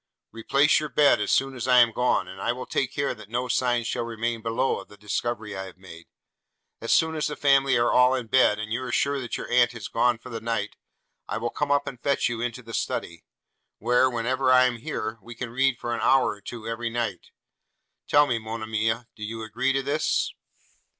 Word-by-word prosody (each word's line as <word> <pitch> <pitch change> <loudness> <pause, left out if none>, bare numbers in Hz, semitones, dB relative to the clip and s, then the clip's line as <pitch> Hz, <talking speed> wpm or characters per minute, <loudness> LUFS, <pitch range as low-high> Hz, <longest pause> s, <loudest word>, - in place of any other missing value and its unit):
'Replace 140 +6 +3
your 150 0 -4
bed 145 -1 +4
as - - -1
soon 135 0 +1
as 120 - -4
I 125 -1 +5
am 120 -1 +6
gone, 125 +3 +1
and 95 - -9
I 120 - 0
will 125 +1 -7
take 135 -2 -1
care 140 -1 -1
that 110 -4 -13
no 120 +2 -2
signs 120 -2 +1
shall - - -2
remain 115 0 -3
below 115 +4 0
of - - -11
the 105 - -16
discovery 105 +1 -3
I 95 0 -5
have 95 -1 -12
made. 85 -3 -13 0.7
As 115 - -3
soon 160 0 +3
as 155 -1 -1
the 150 - -4
family 135 -1 +3
are 120 0 +2
all 125 +1 +5
in 125 -2 -3
bed, 110 -2 +4
and 110 +1 -4
you 120 - -1
are 130 - -5
sure 140 0 +1
your 120 - -5
aunt 120 -1 +4
is 110 - -6
gone 120 0 +2
for 120 - -12
the 115 -1 -5
night, 115 -2 -2 0.5
I - - -3
will 120 +1 -3
come 145 -1 -2
up 145 0 +2
and 125 -3 -8
fetch 140 -3 +1
you 115 -1 -4
into 120 +1 -4
the 115 0 -10
study; 85 -5 -3 0.5
where, 125 +3 +3
whenever 130 +2 0
I 130 0 +6
am 125 -2 0
here, 110 0 -4
we 120 0 -11
can 120 0 -6
read 135 0 +1
for 120 - -4
an - - -3
hour 135 -1 +4
or 105 - -10
two 115 +2 -8
every 115 +1 -3
night: 115 -6 -3 0.8
tell 145 0 +5
me, 120 -5 -1
Monimia, 110 +1 -2
do 105 - -10
you 110 +1 -5
agree 120 +5 -1
to 135 0 0
this?' 145 +3 0
120 Hz, 225 wpm, -25 LUFS, 115-130 Hz, 0.8 s, am